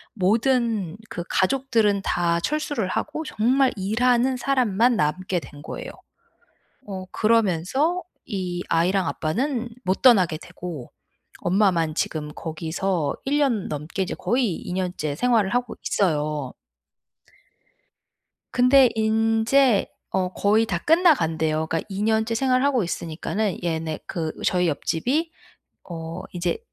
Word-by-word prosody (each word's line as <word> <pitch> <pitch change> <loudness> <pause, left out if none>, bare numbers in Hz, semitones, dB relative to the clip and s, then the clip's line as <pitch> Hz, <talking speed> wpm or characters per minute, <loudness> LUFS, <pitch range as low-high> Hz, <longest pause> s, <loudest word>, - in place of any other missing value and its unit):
모든 220 -2 +1
그 175 - -5
가족들은 225 -2 +2
다 170 -1 +1
철수를 290 - -1
하고 300 +10 -3
정말 260 0 +2
일하는 240 +6 +2
사람만 245 -3 +2
남게 180 +3 0
된 145 -2 -12
거예요. - - -7 1.0
어 190 -2 -6
그러면서 230 - +1 0.2
이 180 -3 -3
아이랑 180 +3 +2
아빠는 235 - -2
못 185 +1 -1
떠나게 185 -10 +5
되고 170 -5 -8 0.5
엄마만 175 -4 +2
지금 150 -2 -2
거기서 165 +1 -2
1 285 +2 +1
년 245 -9 +1
넘게 150 +6 -3
이제 185 - -3
거의 240 -7 0
2 - - -7
년째 180 -6 -2
생활을 230 -1 +2
하고 245 -1 -1
있어요. 150 -7 0 2.0
근데 255 +1 +6
인제 225 +2 +3 0.2
어 185 -1 -1
거의 215 +3 +3
다 180 - -1
끝나간대요. 160 - +2
그러니까 165 0 -1
2 200 0 -4
년째 220 +1 +1
생활하고 255 0 +2
있으니까는 175 +4 -3
얘네 160 -2 -2
그 160 -3 -3
저희 180 -1 +2
옆집이 255 - -1 0.6
어 165 +1 -6
이제 175 0 -1
195 Hz, 245 characters per minute, -24 LUFS, 170-245 Hz, 2.0 s, 근데